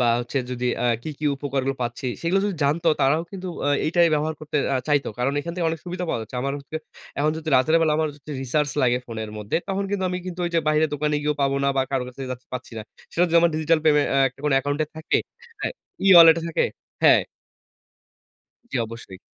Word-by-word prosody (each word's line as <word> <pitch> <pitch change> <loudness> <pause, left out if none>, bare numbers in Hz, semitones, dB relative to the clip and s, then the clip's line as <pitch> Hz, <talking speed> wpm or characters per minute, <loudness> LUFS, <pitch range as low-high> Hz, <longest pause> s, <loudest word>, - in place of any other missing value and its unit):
বা 120 - +3
হচ্ছে 120 +3 -3
যদি 125 0 -2 0.2
আ - - 0 0.2
কি, 155 - -4
কি 155 - -6
উপকারগুলো 135 -1 -2
পাচ্ছি 120 +2 -4 0.2
সেগুলো 180 +4 +2
যদি 200 -4 -2
জানতো, 165 +4 +2
তারাও 145 +4 +3
কিন্তু 190 -2 -6 0.2
আ - - +2 0.2
এইটাই 170 +1 +4
ব্যবহার 155 +1 -1
করতে 150 0 -4 0.2
আ - - +3
চাইতো। 145 -2 +2
কারণ 125 +3 +1
এখান 170 +3 -5
থেকে 175 -2 -1
অনেক 165 -1 -5
সুবিধা 180 0 -4
পাওয়া 115 - -1
যাচ্ছে। 110 - -8
আমার 140 - -1 0.7
এখন 150 +2 +2
যদি 160 0 -6
রাতের 130 +5 +3
বেলা 160 -2 +3
আমার 160 -1 +1 0.3
রিসার্চ 145 +3 0
লাগে 125 -1 +3
ফোনের 110 -2 -5
মধ্যে, 105 +5 -2
তখন 195 0 -1
কিন্তু 200 -2 -1
আমি 180 - -2
কিন্তু 180 -1 -5
ঐ - - +1
যে 165 - +4
বাইরের 155 +1 +3
দোকানে 150 +1 0
গিয়েও 150 0 0
পাবো 140 0 +1
না - - +3
বা 135 - +3
কারো 135 -2 0
কাছে 125 +2 -12 0.3
পাচ্ছি 125 -1 -6
না। - - -5 0.3
সেটা 175 - +3
য - - +1
আমার 170 0 +4
ডিজিটাল 155 +1 +2
পেমে 150 -2 +5
অ্যা 135 - +2
একটা 125 - -19
কোন 150 - +2
অ্যাকাউন্টে 145 +3 0
থাকে 160 - +1 0.4
হ্যাঁ, - - -2 0.3
ই-ওয়ালেট 170 -3 +9
থাকে 165 - +1 0.4
হ্যাঁ। - - +6 1.5
জ্বী - - -2
অবশ্যই। 110 -4 -10
150 Hz, 210 wpm, -23 LUFS, 135-165 Hz, 1.5 s, ই-ওয়ালেট